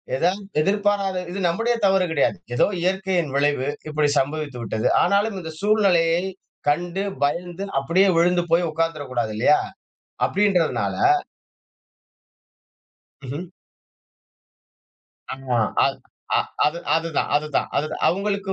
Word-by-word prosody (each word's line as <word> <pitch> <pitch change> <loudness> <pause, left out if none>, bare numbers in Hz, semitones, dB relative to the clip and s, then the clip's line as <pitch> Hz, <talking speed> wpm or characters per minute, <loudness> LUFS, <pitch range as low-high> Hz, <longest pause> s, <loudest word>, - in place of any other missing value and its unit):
ஏதாவது 180 +8 0 0.2
எதிர்பாராத 200 0 +1
இது 195 - -4
நம்முடைய 230 +8 +1
தவறு 190 -1 +3
கிடையாது. 145 -3 +1 0.2
ஏதோ 120 - +4 0.2
இயற்கையின் 185 -4 0
விளைவு 140 -1 +1 0.2
இப்படி 150 -1 +1
சம்பவித்து 145 -1 -3
விட்டது. 110 0 -1
ஆனாலும் 200 +3 +2
இந்த 160 -3 -7
சூழ்நிலையை 180 -5 +3 0.5
கண்டு 175 +5 -1 0.2
பயந்து 175 +6 -2
அப்படியே 175 +8 +3
விழுந்து 175 +1 +3
போய் 170 +1 +3
உட்கார்ந்துடக்கூடாது 145 -8 -2
இல்லையா? - - +4 0.7
அப்டின்றதுனால 190 -5 +1 2.3
ம்ஹும். 140 +6 -5 1.9
ஆ - - -2 0.5
அது - - 0 0.4
அ - - +4 0.3
அது 155 +3 -1 0.2
அதுதான் 165 -2 0
அதுதான் 150 0 -1
அதுதான் 150 +2 -2
அவங்களுக்கு 200 +1 -1
170 Hz, 105 wpm, -23 LUFS, 150-195 Hz, 2.3 s, ஏதோ